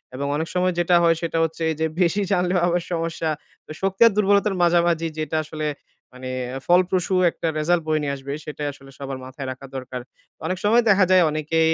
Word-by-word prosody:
এবং 140 +2 -3
অনেক 160 +2 -2
সময় 180 0 +2
যেটা 175 0 +3
হয় 165 0 +4
সেটা 165 -1 -2
হচ্ছে 165 +1 -3
এইযে 160 +1 -1 0.2
বেশি 180 +4 +2
জানলেও 180 -1 +2
আবার 175 0 +1
সমস্যা। 165 -1 -2 0.4
তো - - -11
শক্তি 195 +2 -2
আর - - +3
দুর্বলতার 200 0 +3
মাঝামাঝি 170 -1 +3
যেটা 155 +1 -2
আসলে 155 0 -4 0.5
মানে 130 0 -7 0.4
ফলপ্রসু 180 +1 +2 0.2
একটা 165 - -4
রেজাল্ট 170 +2 +2
বয়ে 155 -1 +1
নিয়ে 140 -1 -1
আসবে 140 +1 -7
সেটাই 150 -1 -4
আসলে 135 -1 -15
সবার 135 -1 -5
মাথায় 130 +1 -7
রাখা 130 +1 -9
দরকার। 130 -1 -5 0.4
অনেক 185 0 -1
সময় 230 +3 +5
দেখা 195 -1 +5
যায় 185 -2 +6
অনেকে 155 +1 -1
165 Hz, 190 wpm, -23 LUFS, 150-180 Hz, 0.5 s, যায়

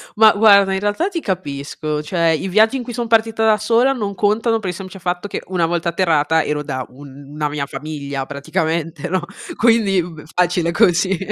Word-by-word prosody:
Ma 215 0 +7
guarda, 200 -2 +5
in 190 - -1
realtà 205 - 0
ti 340 -4 -4
capisco, 150 -3 -4
cioè, 170 +1 0
i 160 +4 0
viaggi 220 +7 +3
in 245 - -5
cui 240 0 -7
son 235 -1 -3
partita 225 0 +2
da 215 -1 +4
sola 235 +5 +2
non 205 -5 -4
contano, 225 +3 +1
per 195 -4 -4
il 180 - -4
semplice 195 +1 -9
fatto 180 +2 -3
che - - -5
una 180 -3 0
volta 170 +1 -1
atterrata 160 -3 +2
ero 150 0 -2
da 130 -2 -4
una 145 +2 -7
mia 145 -1 -3
famiglia 140 -2 -5
praticamente, 160 +3 -3
no, 185 -1 0 0.3
quindi 220 -5 +3
b 160 -3 -10
facile 175 -1 +1
così. 180 +2 +2
180 Hz, 190 wpm, -19 LUFS, 155-215 Hz, 0.3 s, Ma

